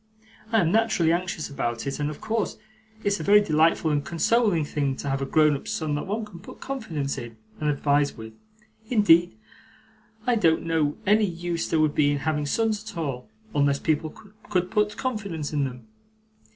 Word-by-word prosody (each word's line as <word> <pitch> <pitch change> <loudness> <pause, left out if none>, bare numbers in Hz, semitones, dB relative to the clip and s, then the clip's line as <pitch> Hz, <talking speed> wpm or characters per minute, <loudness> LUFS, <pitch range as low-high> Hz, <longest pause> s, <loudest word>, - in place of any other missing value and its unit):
I 225 -2 +4
am 165 -2 +1
naturally 215 -7 +3
anxious 175 -3 -2
about 120 -4 -3
it, 140 +1 -3
and 145 0 0
of 150 - -7
course 220 -2 -2 0.5
it's 200 0 +1
a - - -4
very 205 +1 +7
delightful 160 -4 +2
and 145 -1 +1
consoling 175 0 +2
thing 140 -2 -1
to 140 - -6
have 135 0 -1
a 135 - -2
grown 150 0 +4
up 135 - -8
son 160 -8 -2
that 145 - -3
one 215 +3 -2
can 195 -5 -12
put 185 - -12
confidence 180 - -4
in, 115 -2 -9 0.2
and 150 - 0
advise 145 -1 +1
with; 110 0 -9 0.6
indeed 175 -7 +4 0.9
I 250 - +3
don't 165 -6 +3
know 160 -3 0
any 210 +2 +4
use 175 -2 -3
there 160 - +2
would 155 -1 +2
be 145 -1 +3
in - - 0
having 150 +1 -1
sons 220 +4 0
at 220 -4 -9
all, 135 -6 -4 0.2
unless 140 -1 +2
people 155 +1 0 0.4
could 185 -3 0
put 210 -1 +1
confidence 200 - -3
in 145 -2 +1
them. 125 -3 -7
160 Hz, 190 wpm, -25 LUFS, 145-205 Hz, 0.9 s, very